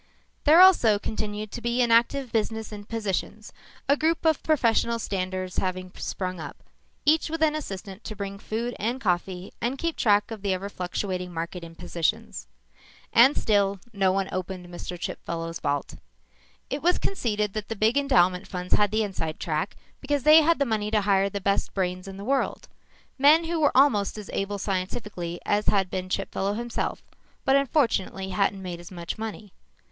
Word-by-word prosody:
There 315 +3 +7
also 290 - +7
continued 210 0 -4
to 240 - -6
be 235 +2 +1
an 235 - +1
active 240 +2 +3
business 220 0 -1
in 205 -1 -8
positions, 210 -1 -3 0.3
a 280 - +5
group 320 +2 0
of 320 -2 +3
professional 235 -6 +2
standers 185 -3 -3
having 185 0 -2
sprung 185 -2 -4
up, 145 -3 -7 0.5
each 315 +2 +3
with 325 0 -1
an 305 -1 +4
assistant 200 -8 -6
to 215 - -6
bring 200 -1 -5
food 235 +4 -3
and 235 +5 -1
coffee 180 -3 -2
and 245 +4 -1
keep 335 +2 -2
track 205 0 +2
of 220 -3 -6
the 195 -1 0
ever 195 +2 -5
fluctuating 180 -1 -3
market 170 +1 -5
in 165 0 -10
positions. 165 - -2 0.7
And 260 +5 +6
still 200 -2 +2
no 195 -2 +2
one 195 0 0
opened 185 0 -4
Chipfellow's 170 -1 -5
vault. 145 0 -2 0.8
It 280 - -2
was 355 +2 +3
conceded 210 - -1
that 215 -1 -4
the 225 - -4
big 220 +4 +2
endowment 185 -10 +3
funds 180 -1 -4
had 205 -1 +4
the 215 +2 +1
inside 165 -6 -4
track 160 +3 -2 0.2
because 285 -1 -1
they 310 +2 +8
had 330 +2 +3
the 280 - +1
money 215 -3 -1
to 215 -1 +2
hire 195 -1 +2
the 200 0 -4
best 200 0 0
brains 185 -1 -2
in 195 0 -8
the 200 - -7
world; 270 +2 -1 0.5
men 300 +4 +6
who 330 0 -2
were 290 -4 +3
almost 215 -8 +4
as 210 -2 -8
able 200 +1 -2
scientifically 185 -2 -3
as 205 +1 +1
had 190 -3 +2
been 185 0 -3
Chipfellow 195 +1 -1
himself 235 +1 -3 0.4
but 270 - +4
unfortunately 235 -9 +1
hadn't 195 0 0
made 175 -2 -5
as 175 - -11
much 175 +2 -6
money. 220 -2 -6
205 Hz, 175 wpm, -26 LUFS, 185-240 Hz, 0.8 s, they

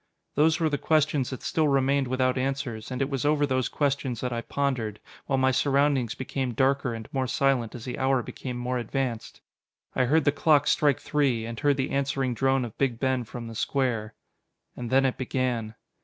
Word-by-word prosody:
Those 155 +3 +3
were 165 - +2
the 145 -2 -1
questions 150 -4 +2
that 130 - -7
still 155 -2 +1
remained 140 -1 +2
without 130 0 +1
answers: 130 -4 -3
and 130 +1 -1
it 135 - -3
was 135 -2 -1
over 145 0 +3
those 130 -2 0
questions 140 -4 -1
that 125 -1 -2
I 115 - -2
pondered, 120 -6 -2 0.3
while 135 - +1
my 130 0 +3
surroundings 135 -3 +2
became 130 -2 -3
darker 135 -1 +1
and 110 -1 -8
more 130 -2 0
silent 130 -3 +1
as 115 - -8
the 125 - -5
hour 130 -2 +2
became 125 +1 -6
more 125 +1 -2
advanced. 120 0 -3 0.5
I 130 - +3
heard 155 +4 +3
the 145 - +5
clock 145 -1 +3
strike 145 -3 +3
three, 135 -7 0
and 115 0 -6
heard 145 -2 +2
the 135 - -1
answering 135 -2 0
drone 135 +1 +1
of 115 - -9
Big 125 -4 0
Ben 130 -2 0
from 120 +1 -7
the 115 - -7
square. 115 -3 -1 0.6
And 120 -2 -5
then 135 +2 +4
it 130 - -1
began. 125 -4 -2
130 Hz, 200 wpm, -27 LUFS, 120-140 Hz, 0.6 s, the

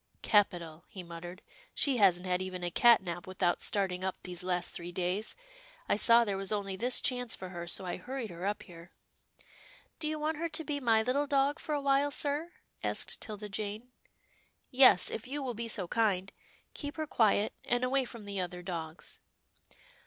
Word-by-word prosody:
" - - -40
Capital," 175 -6 +2
he 185 - -9
muttered, 175 +2 -9 0.2
" - - -28
she 275 -3 +2
hasn't 185 -4 +4
had 180 0 0
even 185 -1 -5
a 175 - -1
cat 235 +1 +6
nap 175 -1 -5
without 185 -2 0
starting 185 -3 +1
up 190 -1 -1
these 180 0 -2
last 180 -1 -1
three 175 +1 -5
days. 185 +4 -2 0.5
I - - +3
saw 230 +2 +5
there 200 -2 -1
was 195 0 -3
only 200 -2 -2
this 245 +6 +1
chance 245 -2 0
for 185 - -8
her, 175 -1 -6
so 185 +2 +1
I 180 - -3
hurried 245 +2 -5
her 170 +1 -8
up 205 - -2
here." 170 -1 -13 0.6
" - - -25
Do 310 - -1
you 310 0 -1
want 305 +1 -1
her 335 +1 -2
to 310 +1 -2
be 295 -2 -2
my 225 -4 +3
little 275 +5 +1
dog 280 +2 +2
for 305 - -2
a 290 - -1
while, 275 +1 +3
sir? 295 +4 0 0.2
" - - -35
asked - - -1
'Tilda 210 -1 -6
Jane. 215 +4 -5 0.4
" - - -35 0.3
Yes, 255 -8 +6
if 225 +3 -5
you 285 +2 -3
will 250 -2 -2
be 230 +1 -4
so 195 -5 -2
kind. 200 -3 +1 0.4
Keep 290 0 -6
her 310 - -1
quiet, 215 -6 +2
and 245 +1 0
away 265 +1 +2
from 235 -3 -9
the 200 -1 -4
other 180 -1 -4
dogs." 165 -3 -6
210 Hz, 205 wpm, -31 LUFS, 180-260 Hz, 0.6 s, cat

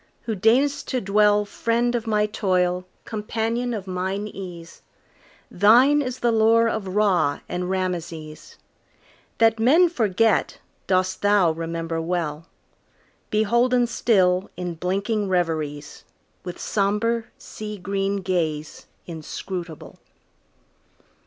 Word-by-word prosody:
who 225 - -3
deign'st 250 +9 +2
to 255 - -1
dwellFriend 210 +3 +1
of 235 -1 -2
my 210 -1 +2
toil, 185 -3 0 0.2
companion 225 +3 -2
of 210 -5 -4
mine 190 +2 -3
ease, 175 -4 -9 0.7
Thine 245 +10 +5
is 255 -2 -5
the 240 - +2
lore 225 +1 +4
of 200 -4 -3
Ra 190 -9 +2
and 180 0 -3
Rameses; 170 -4 -4 0.8
That 225 0 +3
men 315 +10 +5
forget 225 - +1 0.3
dost 185 0 0
thou 205 -4 +4
remember 165 0 -4
well, 165 -1 -3 0.8
Beholden 235 +4 +2
still 190 -6 +2
in 180 -1 -4
blinking 200 +5 -1
reveriesWith 165 0 -4
sombre, 215 +3 0
sea 210 -1 -8
green 195 +1 -2
gaze 160 -5 -2 0.2
inscrutable. 170 +1 -7
200 Hz, 100 wpm, -23 LUFS, 180-225 Hz, 0.8 s, Thine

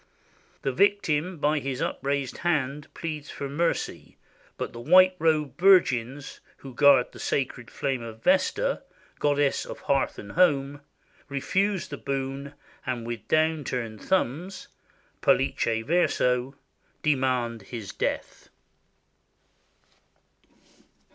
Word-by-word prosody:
The 135 - +1
victim 180 -1 +1
by 150 +1 +1
his 135 -2 -4
upraised 140 -1 -2
hand 150 -4 -1
pleads 155 -3 -5
for 140 - -5
mercy, 165 +5 -2 0.4
but - - -4
the 120 - -8
white 185 +8 +6
robed 155 -4 +1
Vir 190 +1 +8
gins, 130 -1 -5 0.2
who 135 -2 -11
guard 140 -1 +5
the - - -13
sacred 125 -3 -2
flame 135 -3 -2
of 115 -1 -9
Vesta, - - +2 0.4
goddess 145 -1 +2
of - - -9
hearth 135 -1 0
and 100 - -9
home, 145 -5 +2 0.5
refuse 190 +8 0
the 145 - -6
boon, 135 +1 -4 0.3
and 125 -3 -3
with 115 -3 -6
down 155 -1 +2
turned 115 -4 -4
thumbs 185 +1 -1 0.5
{pollice 115 -1 +2
verso) 130 -6 +1 0.5
demand 130 -5 +1
his 105 +1 -7
death. - - -3
140 Hz, 115 wpm, -26 LUFS, 125-160 Hz, 0.5 s, Vir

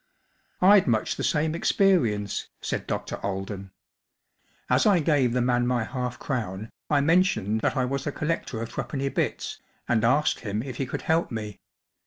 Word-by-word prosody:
“ - - -41
I'd 195 0 +7
much 110 -3 +1
the - - -4
same 155 0 +1
experience*'* 140 - +1
said - - -3
Dr. - - -3
Aiden* 95 0 -4 1.0
"As 125 +8 +3
I 200 -3 +5
gave 145 -6 +2
the 125 0 +1
man 120 0 +2
my 125 -2 +1
half 125 +1 -4
crown 110 -5 -4 0.2
I 145 -2 +3
mentioned 140 - +2
that - - 0
I 130 - +2
was 135 +2 -3
a - - 0
collector 150 -7 -2
of 115 - -6
threepenny 140 -1 -3
bits, - - -2 0.3
and 110 -2 +2
asked 140 +6 +3
him 105 0 -3
if 130 -3 -7
he 135 - -2
could - - -5
help 160 +1 +1
me. 105 -4 -6
125 Hz, 175 wpm, -26 LUFS, 110-150 Hz, 1.0 s, I'd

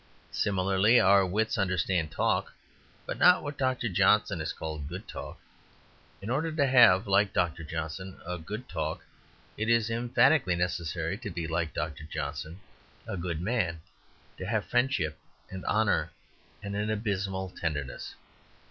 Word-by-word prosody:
Similarly, 100 +3 +3
our 100 0 +6
wits 110 +4 0
understand 90 -3 +1
talk, - - 0 0.5
but - - -5
not 180 0 +6
what 145 -1 -5
Dr. 130 -3 0
Johnson 100 -3 +3
called 80 -1 -5
a 70 - -6
good 90 +7 -7
talk. - - -7 0.9
In 110 - -3
order 155 +5 0
to 155 -2 +2
have, 120 -7 +6
like 100 0 +3
Dr. 85 -1 0
Johnson, 80 +4 -5
a 90 0 -4
good 105 +10 -7
talk, 80 -2 -4 0.5
it 110 +2 -1
is 115 -1 +3
emphatically 120 - +3
necessary 85 +1 -2
to 120 -4 -5
be, 85 -3 -4
like 80 0 -2
Dr. 75 -1 -4
Johnson, 80 +2 -5 0.5
a - - -4
good 85 -2 -3
man 95 -5 0 0.6
to 95 - -5
have 110 -2 0
friendship 125 - 0 0.3
and 95 -1 -6
honour - - +2 0.5
and 100 0 -4
an 105 +1 -1
abysmal 100 -3 -2
tenderness. 75 -8 -4
95 Hz, 145 wpm, -29 LUFS, 85-110 Hz, 0.9 s, our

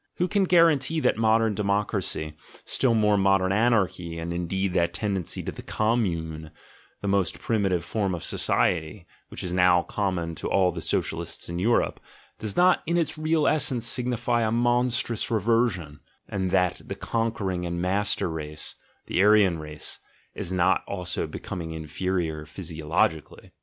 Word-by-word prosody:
Who 180 - 0
can 200 0 +2
guarantee 165 -4 +4
that - - +3
modern 110 0 +3
democracy, 100 -6 -1 0.3
still 120 -3 +2
more 105 -2 +3
modern 95 -1 +3
anarchy, 95 -6 +1
and 85 +1 -4
indeed 90 +2 -1
that 85 -2 +1
tendency 100 -6 -2
to - - -4
the - - -9
"Commune," 85 -9 -1 0.5
the - - -1
most 100 -3 +1
primitive 95 -6 0
form 100 -2 -1
of 85 - -7
society, 85 +2 0 0.2
which - - -7
is 90 - -3
now 90 -1 +4
common 90 -5 -2
to - - -2
all 95 -2 +3
the 85 -1 -6
Socialists - - -2
in 85 0 -3
Europe, 115 +6 +1 0.4
does 110 -2 -4
not 180 0 +5
in 170 +1 +1
its 165 -4 0
real 155 0 +1
essence 130 -6 +1
signify 120 0 0
a 110 -1 +1
monstrous 120 -1 +1
reversion 110 -9 0
— - - -42
and 95 -1 -2
that 90 0 +1
the - - -4
conquering 110 -6 -2
and 85 0 -3
master 95 +3 0
race 75 -2 -5 0.2
— - - -40
the 90 - 0
Aryan 100 -5 +5
race, 75 -1 -5 0.3
is 85 - -5
not 95 +1 +2
also 90 -3 -3
becoming 80 -2 -6
inferior 80 0 -3
physiologically?) 80 -1 -2
95 Hz, 155 wpm, -26 LUFS, 85-115 Hz, 0.5 s, not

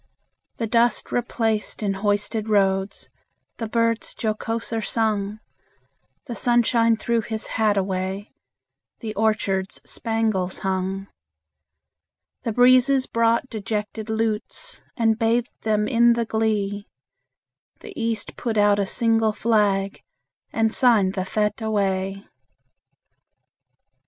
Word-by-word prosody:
The 230 - -1
dust 235 +2 +2
replaced 225 -3 -1
in 200 -1 +1
hoisted 205 +2 -1
roads, 195 -1 +1 0.5
The 225 -2 -4
birds 230 0 0
jocoser 225 +1 -2
sung; 215 -2 -1 0.9
The 245 - -5
sunshine 235 -1 +3
threw 235 0 0
his 220 0 -4
hat 215 -2 +1
away, 190 +1 -2 0.7
The 220 -3 -4
orchards 200 -3 0
spangles 220 -5 -1
hung. 190 0 -2 1.4
The 230 - -2
breezes 255 +3 +5
brought 230 +2 +1
dejected 215 -1 -4
lutes, 225 - -3 0.2
And 225 -2 +2
bathed 230 +1 +1
them 215 -1 +1
in 235 +1 +5
the 235 0 -1
glee; 210 -2 -1 0.9
The 425 - -10
East 225 -6 -2
put 230 -3 -3
out 205 0 +4
a 200 - 0
single 225 -1 +2
flag, 205 -3 +1 0.5
And 225 0 +1
signed 220 -7 +4
the 185 -2 -2
fete 210 +2 -1
away. 195 -2 -1
220 Hz, 105 wpm, -23 LUFS, 205-230 Hz, 1.4 s, breezes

